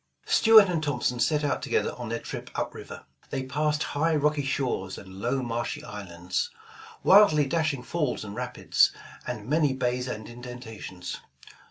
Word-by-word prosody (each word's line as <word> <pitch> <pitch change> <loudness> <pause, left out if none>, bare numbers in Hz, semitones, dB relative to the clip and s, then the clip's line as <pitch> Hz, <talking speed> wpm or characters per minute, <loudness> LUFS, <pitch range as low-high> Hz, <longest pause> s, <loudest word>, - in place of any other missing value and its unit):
Stuart 220 -2 +7
and 170 -3 0
Thompson 145 -4 -1
set 150 +3 +2
out 145 - 0
together - - 0
on - - -6
their - - -1
trip - - -7
up - - -2
river. - - -9 0.3
They 135 - -2
passed 150 +3 0
high 160 +3 0
rocky 150 0 +1
shores 130 -8 -2
and 95 0 -10
low 130 +3 0
marshy 120 0 -3
islands, 95 - -4 0.5
wildly 175 -7 +7
dashing 150 -3 0
falls 145 0 -1
and 100 0 -7
rapids, 125 0 +2 0.4
and 110 -3 -5
many 150 -1 +2
bays 125 -1 -1
and 110 -3 -5
indentations. 120 -7 -8
130 Hz, 155 wpm, -27 LUFS, 120-150 Hz, 0.5 s, Stuart